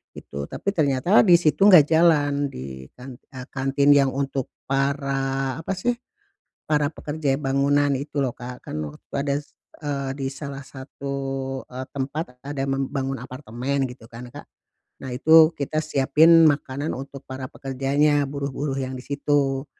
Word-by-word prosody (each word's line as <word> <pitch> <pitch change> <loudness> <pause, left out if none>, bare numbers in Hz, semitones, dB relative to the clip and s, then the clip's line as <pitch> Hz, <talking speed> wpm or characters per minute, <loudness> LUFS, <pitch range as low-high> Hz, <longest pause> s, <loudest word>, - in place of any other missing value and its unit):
gitu. 70 0 -7
Tapi - - -3
ternyata 155 +2 +3
di 175 - +8
situ 170 +4 +4
enggak 165 -7 +7
jalan, 145 -4 +3
di 65 - -8
kan 125 0 -11
eee, 130 -3 -11
kantin 140 +1 +2
yang 140 -1 +5
untuk 135 -1 -2 0.2
para, 135 0 -1
apa 195 +4 -3
sih, 185 +7 0 0.8
para 150 0 +1
pekerja 150 -2 -2
ya 135 - -1
bangunan 140 +1 +2
itu 145 +1 -3
loh 135 - +1
Kak. 125 0 -8
Kan - - -4 0.3
wadas 140 +1 -3 0.2
eee, 140 -2 -3
di 135 -1 -2
salah 140 0 -7
satu, 140 0 -8 0.5
e 125 - -11
tempat 135 -1 -4
ada 145 -1 -4
membangun 135 0 -2
apartemen 130 +2 -3
gitu 125 -2 -12
kan 120 +1 -9
Kak. - - -11 0.6
Nah 130 - -5
itu 160 +5 +6
kita 155 +2 -2
siapin 155 +3 +5
makanan 145 0 -1
untuk 135 +1 -9
para 130 0 -6
pekerjanya, 140 +2 +1
buruh-buruh 140 0 -3
yang 130 0 -4
di 125 - -8
situ. 140 -1 0
140 Hz, 150 wpm, -23 LUFS, 135-145 Hz, 0.8 s, di